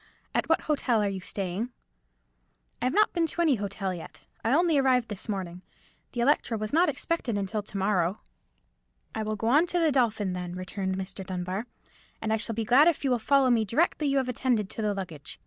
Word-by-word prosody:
At - - 0
what 325 - +3
hotel 250 -7 +1
are - - +1
you 195 -1 -3
staying?" 195 +4 -3 1.1
"I - - 0
have 255 - +1
not 425 0 +4
been 335 -2 +1
to 345 - -2
any 315 -4 +4
hotel 195 -2 -3
yet. 170 - -9 0.2
I 225 - +1
only 325 0 +4
arrived 255 -3 +2
this 210 +1 -6
morning. 180 -3 -4 0.5
The 240 - -1
Electra 240 -3 +2
was 215 +2 -4
not 335 +1 +4
expected 275 -5 -2
until 200 +2 -2
to 205 0 -7
morrow." 190 -2 +1 0.9
"I - - -3
will 215 0 -2
go 220 - -5
on 300 +7 +5
to 355 - -1
the 325 -3 +3
Dolphin, 220 -7 +1
then," 180 -1 -5
returned 190 +1 -3
Mr. 190 0 -6
Dunbar; 185 +4 -4 0.5
"and 220 0 -1
I - - +2
shall 225 0 -2
be 225 0 -1
glad 260 +8 +6
if 335 -4 +2
you 270 - +1
will 245 - +2
follow 265 +3 +3
me 230 -2 +3
directly 300 - +1
you 275 0 +2
have 265 -2 +1
attended 240 -5 0
to - - -5
the 210 -1 0
luggage. 170 -7 -7
220 Hz, 215 wpm, -28 LUFS, 195-270 Hz, 1.1 s, glad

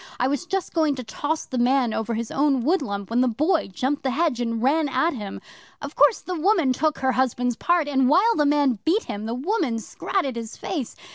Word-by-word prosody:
I 255 - +2
was 285 +6 -2
just 385 -1 -3
going 315 -4 +2
to 255 - -6
toss 295 +7 -3
the 255 - -4
man 245 -1 +2
over 225 +1 -2
his 230 0 -4
own 275 -3 +1
woodlump 235 - -1
when 240 +2 +2
the 255 - +3
Boy 305 - +1
jumped 260 +9 -2
the 265 - -1
hedge 275 -2 0
and 230 -1 -2
ran 295 +3 +2
at 270 +6 +1
him. 205 -6 -6 0.4
Of - - -8
course 460 - +4
the 365 - -5
woman 340 -5 +2
took 310 +3 0
her 265 0 +1
husband's 245 -1 0
part, 345 +3 +1
and 265 -3 +2
while 405 +10 +4
the 295 -1 +2
man 285 -6 +2
beat 375 +8 +2
him, 210 -1 -5
the 230 - -3
woman 290 - -1
scratted 270 - -3
his 230 -1 -7
face. 290 -11 -4
270 Hz, 220 wpm, -23 LUFS, 240-320 Hz, 0.4 s, course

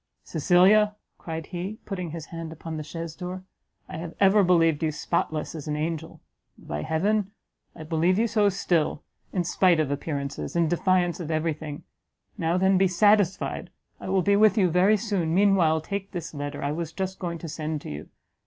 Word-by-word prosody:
"Cecilia," 195 +6 +4 0.2
cried 160 -1 -5
he, 185 +4 -5
putting 180 -4 -4
his 160 0 -6
hand 165 -1 -5
upon 160 0 -7
the 155 - -4
chaise 165 +1 -6
door, 185 0 -6 0.4
"I - - -7
have 165 0 -7
ever 200 +1 +5
believed 165 -4 +3
you 160 -1 +1
spotless 155 0 -2
as 155 -3 -7
an 150 - -1
angel! 160 +1 -4 0.4
and, - - -18
by 75 0 -3
heaven! 200 - 0 0.5
I 160 - -8
believe 165 +4 +1
you 225 - +3
so 210 -2 +3
still, 175 -6 0 0.3
in 180 - 0
spite 175 0 +3
of 150 -3 0
appearances 140 0 -4
in 170 -1 +3
defiance 175 +1 +1
of 165 -3 -5
every 160 0 0
thing! 150 -1 -8 0.5
Now 170 -3 0
then 190 0 +3
be 190 - +5
satisfied; 195 +1 +2 0.3
I - - -7
will 190 -1 +2
be 200 +2 +3
with 215 +1 +5
you 185 -4 +3
very 190 +5 +4
soon. 190 -6 -1
Meanwhile, 185 -5 +4
take 200 +4 -5
this 170 -3 -5
letter, 145 0 -5
I 140 - 0
was 160 +1 -4
just 190 +3 -4
going 170 -2 -3
to 165 - -8
send 155 -1 -4
to - - -7
you. 75 +1 -8
170 Hz, 190 wpm, -26 LUFS, 160-190 Hz, 0.5 s, ever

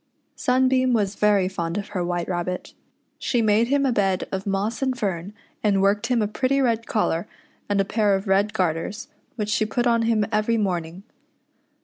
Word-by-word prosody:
Sunbeam 255 0 +2
was 205 -3 +1
very 205 -2 +3
fond 170 -2 -3
of 205 - -4
her 190 -4 -2
White 175 -1 -2
Rabbit. 180 0 -3 0.5
She 245 - 0
niade 220 +1 +3
him 280 +1 +2
a 265 - +2
bed 195 -4 0
of 190 +1 -4
moss 200 +4 -1
and 260 -1 0
fern, 190 -4 -3 0.3
and 205 -2 +3
worked 205 +3 +2
him 240 -3 +2
a - - 0
pretty 260 +6 0
red 230 -4 +1
collar 210 -3 0 0.4
and 200 -1 +1
a 195 - +2
pair 210 -1 +2
of 195 +2 -4
red 195 +2 +2
garters, 180 +4 -2 0.3
which 210 -3 -3
she 215 - +2
put 240 +3 -1
on 235 -1 +3
him 225 -2 +2
every 215 +2 +2
morning. 180 -3 -2
210 Hz, 190 wpm, -23 LUFS, 190-230 Hz, 0.5 s, very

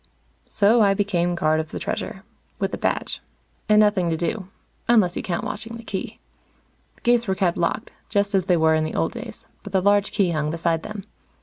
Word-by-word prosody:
So 215 +3 +4
I 200 -2 +4
became 175 -4 0
guard 155 -2 +2
of 160 0 -3
the - - -6
Treasure. - - -4 0.3
With - - -2
a - - -2
badge. - - -1 0.5
And 210 0 +6
nothing 205 -5 +3
to 165 - 0
do 180 +4 -2 0.4
unless 215 -7 +4
you - - -2
count 170 -2 -3
watching 225 +2 -5
the 230 - -11
Key. 195 -4 -5 0.8
The - - -27
gates 240 -1 +2
were 190 - +1
kept 180 -3 +1
locked, 175 +6 -2 0.2
just 205 -1 +1
as 190 -2 +2
they 180 -2 +3
were 160 0 +4
in 155 0 +2
the 155 - -4
old - - 0
days, - - -8 0.2
but 205 - -10
the 190 - +4
large 200 +1 +3
Key 190 -4 +1
hung 150 -2 -1
beside 165 0 0
them. 210 +1 -7
190 Hz, 210 wpm, -23 LUFS, 170-210 Hz, 0.8 s, And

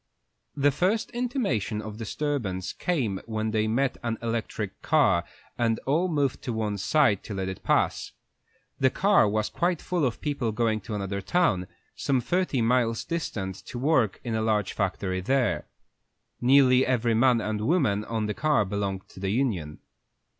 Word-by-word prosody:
The 145 0 +3
first 190 - 0
intimation 235 - -1
of 110 0 -7
disturbance 115 -5 -3
came 120 - -1
when 110 -1 -2
they 110 0 +1
met 130 +4 0
an 115 -2 -2
electric 115 -1 -4
car, 85 0 +3 0.3
and 115 -1 +2
all 160 +7 +2
moved 145 -6 0
to 120 - -3
one 105 -2 -2
side 110 -2 +3
to 105 - -5
let 95 -1 -2
it 95 -1 -6
pass. - - +1 0.7
The 130 - +4
car 195 - +3
was 110 +1 0
quite 175 -1 0
full 180 -3 -1
of 125 -4 0
people 140 -6 -1
going 110 -1 0
to 105 +3 -5
another 100 -1 -3
town, 95 - +1 0.3
some 135 -2 +1
thirty 160 -2 0
miles 115 -1 +2
distant, 100 - -3
to - - -6
work 130 -6 +2
in 115 - -3
a 110 - 0
large 105 -3 0
factory 95 -1 -2
there. 130 +4 0 0.7
Nearly 130 0 +5
every 120 -3 +1
man 120 +1 +4
and 105 -1 -2
woman 130 - +2
on 110 -2 -2
the 105 - -2
car 145 -3 +2
belonged 100 -1 -3
to - - -13
the 95 0 -2
union. 100 - -1
115 Hz, 165 wpm, -27 LUFS, 105-140 Hz, 0.7 s, Nearly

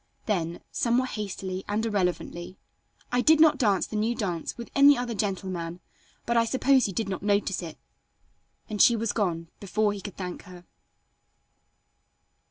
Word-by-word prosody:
Then, 170 -5 -2
somewhat 250 +2 +1
hastily 190 -3 -4
and 215 +2 0
irrelevantly, 180 -3 -2 0.5
"I 245 0 +2
did 315 +3 +5
not 310 -2 +5
dance 205 -6 +2
the - - -8
new 220 +3 0
dance 175 -7 -3
with 235 - -8
any 285 +1 +7
other 245 -1 -2
gentleman 185 -4 -3 0.5
but 235 - 0
I 230 - +5
suppose 260 +2 +3
you 195 - -5
did 225 - -1
not 190 -2 -4
notice 200 -2 +1
it," 165 -3 -8 0.9
and 210 -3 -1
she 235 - +7
was 230 -1 -1
gone 170 -6 -1
before 210 +1 0
he 200 - -7
could 200 0 -8
thank 180 -2 -6
her. 180 -1 -13
205 Hz, 160 wpm, -27 LUFS, 185-235 Hz, 0.9 s, any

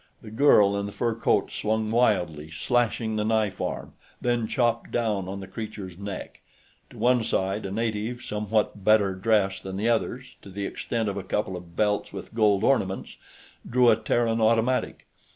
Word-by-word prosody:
The 110 - -10
girl 105 -5 +5
in 100 0 -2
the - - -6
fur 115 +2 -1
coat 115 - +1
swung 110 0 -1
wildly, 90 -10 +1
slashing 110 +4 0
the 105 - 0
knife 110 -3 0
arm, - - -4 0.3
then 120 -2 0
chopped 120 -2 0
down 105 -5 -1
on 100 +1 -5
the 95 - -8
creature's 100 -2 -7
neck. 100 0 -7 0.5
To - - -14
one 125 -1 +3
side, 95 0 -1
a - - -6
native 115 +2 -2
somewhat 105 -1 -1
better 105 -2 +4
dressed 95 0 +1
than 95 0 -6
the 110 +4 +1
others, 120 +2 -2
to - - -12
the 100 +1 -4
extent 115 +2 -2
of 100 -1 -2
a 100 - -4
couple 95 0 -2
of 85 -1 -10
belts 105 -1 0
with 95 -2 -8
gold 105 -3 +3
ornaments, 95 -8 0 0.5
drew 125 -1 +5
a - - +5
Terran 115 +1 0
automatic. 115 +3 +1
110 Hz, 175 wpm, -26 LUFS, 100-115 Hz, 0.5 s, girl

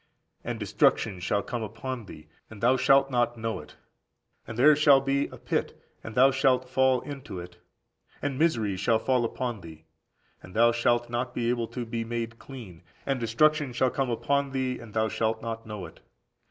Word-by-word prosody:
And - - -4
destruction 100 -5 +1
shall 100 +3 0
come 120 - -4
upon 115 +2 -5
thee, 80 -3 -11 0.2
and 110 - -11
thou 125 +5 +4
shalt 135 +1 +4
not 120 -1 +1
know 115 0 -3
it. - - -13 0.7
(And 110 - -7
there 150 +4 +7
shall 145 -2 +6
be) 135 +1 0
a - - -12
pit, - - -2 0.2
and 110 - -8
thou 135 +2 +6
shalt 130 -1 +2
fall 130 0 +2
into 140 -10 -7
it; 85 0 -10 0.6
and 140 -1 -3
misery 115 - +1
shall 110 +4 +2
fall 125 +2 +1
upon 120 -2 -3
thee, 80 -2 -12 0.6
and 90 - -13
thou 120 +1 +5
shalt 120 0 +1
not 120 +1 -2
be 120 0 +1
able 120 -2 -1
to 125 0 -5
be 115 0 -3
made 115 0 -4
clean; 110 -11 -11 0.2
and 135 -2 0
destruction 140 +4 +2
shall 130 +1 +2
come 135 -2 -1
upon 135 +4 0
thee, 130 -1 -1
and 110 -2 -12
thou 110 0 +2
shalt 110 0 -1
not 115 0 -6
know 105 -4 -6
it. 80 - -13
120 Hz, 190 wpm, -27 LUFS, 110-130 Hz, 0.7 s, there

